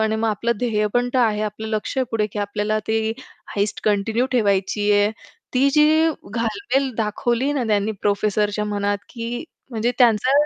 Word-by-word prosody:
आणि 220 Hz, 0 st, +1 dB
मग 225 Hz, 0 st, 0 dB
आपलं 230 Hz, +3 st, 0 dB
ध्येय 215 Hz, -3 st, +1 dB
पण 245 Hz, 0 st, +2 dB
तर -, -, +4 dB
आहे, 220 Hz, -4 st, +2 dB
आपलं 215 Hz, +1 st, -4 dB
लक्ष 215 Hz, +4 st, -3 dB
आहे 260 Hz, -, +2 dB
पुढे, 215 Hz, -2 st, +1 dB
की -, -, -4 dB
आपल्याला 210 Hz, +1 st, -1 dB
ती 220 Hz, 0 st, 0 dB, 0.4 s
हाईस्ट 205 Hz, +1 st, -1 dB
कंटिन्यू 215 Hz, +4 st, +1 dB
ठेवायची 205 Hz, -2 st, +1 dB
आहे, 205 Hz, 0 st, +4 dB, 0.4 s
ती 265 Hz, +2 st, +4 dB
जी 310 Hz, +2 st, +4 dB, 0.3 s
घालमेल 260 Hz, -, 0 dB
दाखवली 235 Hz, +5 st, 0 dB
ना 275 Hz, -4 st, -1 dB
त्यांनी 210 Hz, 0 st, +1 dB
प्रोफेसरच्या 210 Hz, +1 st, +1 dB
मनात, 205 Hz, -1 st, -1 dB
की 240 Hz, +3 st, -5 dB, 0.3 s
म्हणजे 235 Hz, +2 st, 0 dB
त्यांचा 240 Hz, +1 st, +4 dB
220 Hz, 165 wpm, -22 LUFS, 210-240 Hz, 0.4 s, तर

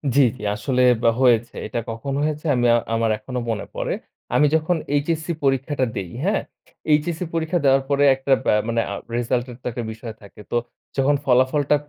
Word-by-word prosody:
জ্বী, 140 Hz, -, +7 dB
জ্বী। -, -, -11 dB
আসলে 125 Hz, +5 st, 0 dB
আব 115 Hz, -, -9 dB, 0.2 s
হয়েছে। 120 Hz, -3 st, +3 dB
এটা 120 Hz, -, -3 dB
কখন 115 Hz, +5 st, -4 dB
হয়েছে 150 Hz, +1 st, -2 dB
আমি 120 Hz, 0 st, +1 dB
আ -, -, +4 dB, 0.2 s
আমার 115 Hz, 0 st, +1 dB
এখনো 125 Hz, +4 st, -5 dB
মনে 110 Hz, -, -3 dB
পড়ে। -, -, -2 dB, 0.4 s
আমি 150 Hz, -, +5 dB
যখন 160 Hz, +3 st, +1 dB, 0.2 s
এইচএসসি 160 Hz, +3 st, -1 dB
পরীক্ষাটা 135 Hz, 0 st, +1 dB
দেই। 95 Hz, -4 st, -4 dB
হ্যাঁ? 200 Hz, +4 st, +1 dB, 0.5 s
এইচএসসি 160 Hz, +3 st, +1 dB
পরীক্ষা 165 Hz, +1 st, 0 dB
দেওয়ার 135 Hz, 0 st, +4 dB
পরে 140 Hz, 0 st, +3 dB
একটা 135 Hz, +1 st, +1 dB
বা -, -, +4 dB
মানে 115 Hz, 0 st, +1 dB
আ -, -, -2 dB, 0.2 s
রেজাল্ট 120 Hz, +1 st, 0 dB
এর -, -, -9 dB
তো -, -, -29 dB
একটা 120 Hz, +1 st, -4 dB
বিষয় 110 Hz, +1 st, -8 dB
থাকে। 100 Hz, 0 st, -14 dB
তো -, -, +2 dB, 0.4 s
যখন 135 Hz, +2 st, +3 dB
ফলাফলটা 130 Hz, +3 st, +3 dB
135 Hz, 185 wpm, -22 LUFS, 120-150 Hz, 0.5 s, জ্বী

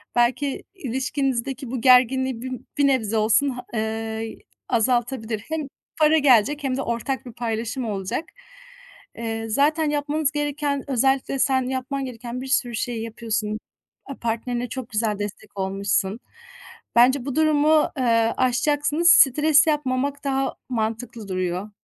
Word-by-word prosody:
belki 255 Hz, +3 st, +1 dB
ilişkinizdeki 265 Hz, -, -2 dB
bu 255 Hz, -3 st, -3 dB
gerginliği 255 Hz, 0 st, +4 dB
bir 260 Hz, +1 st, -5 dB, 0.3 s
bir 285 Hz, -1 st, +4 dB
nebze 225 Hz, -5 st, +1 dB
olsun 220 Hz, +6 st, +3 dB
ha 250 Hz, -1 st, -6 dB
eee, 225 Hz, -, 0 dB
y 220 Hz, 0 st, -4 dB, 0.3 s
azaltabilir. 235 Hz, -2 st, 0 dB
Hem 315 Hz, -2 st, -2 dB, 0.3 s
para 310 Hz, +1 st, +5 dB
gelecek 280 Hz, +1 st, +4 dB
hem 260 Hz, -2 st, -1 dB
de -, -, -1 dB
ortak 240 Hz, +2 st, -3 dB
bir 245 Hz, -, -9 dB
paylaşım 235 Hz, +2 st, -3 dB
olacak. 200 Hz, -, -3 dB, 0.9 s
Eee, 225 Hz, -1 st, -4 dB
zaten 300 Hz, +6 st, +2 dB
yapmanız 295 Hz, 0 st, 0 dB
gereken 290 Hz, -1 st, -2 dB
özellikle 265 Hz, +1 st, +1 dB
sen 260 Hz, -1 st, +2 dB
yapman 265 Hz, +1 st, -3 dB
gereken 245 Hz, 0 st, -6 dB
bir 265 Hz, -, -6 dB
sürü 245 Hz, -2 st, 0 dB
şeyi 225 Hz, 0 st, -3 dB
yapıyorsun. 220 Hz, -1 st, -3 dB, 0.5 s
Aaa, 275 Hz, -, -7 dB
partnerine 240 Hz, +1 st, -3 dB
çok 255 Hz, -1 st, -6 dB
güzel 210 Hz, -1 st, -1 dB
destek 205 Hz, 0 st, -7 dB
olmuşsun. 195 Hz, +2 st, -1 dB, 0.8 s
Bence 250 Hz, +2 st, +5 dB
bu 275 Hz, -2 st, -3 dB
durumu, 310 Hz, 0 st, +4 dB
eee, 230 Hz, -3 st, +2 dB
aşacaksınız, 290 Hz, +6 st, +2 dB
stres 295 Hz, +3 st, +6 dB
yapmamak 285 Hz, -2 st, 0 dB
daha 270 Hz, -1 st, -1 dB
mantıklı 225 Hz, -1 st, -3 dB
duruyor. 185 Hz, +2 st, -3 dB
250 Hz, 135 wpm, -23 LUFS, 225-275 Hz, 0.9 s, stres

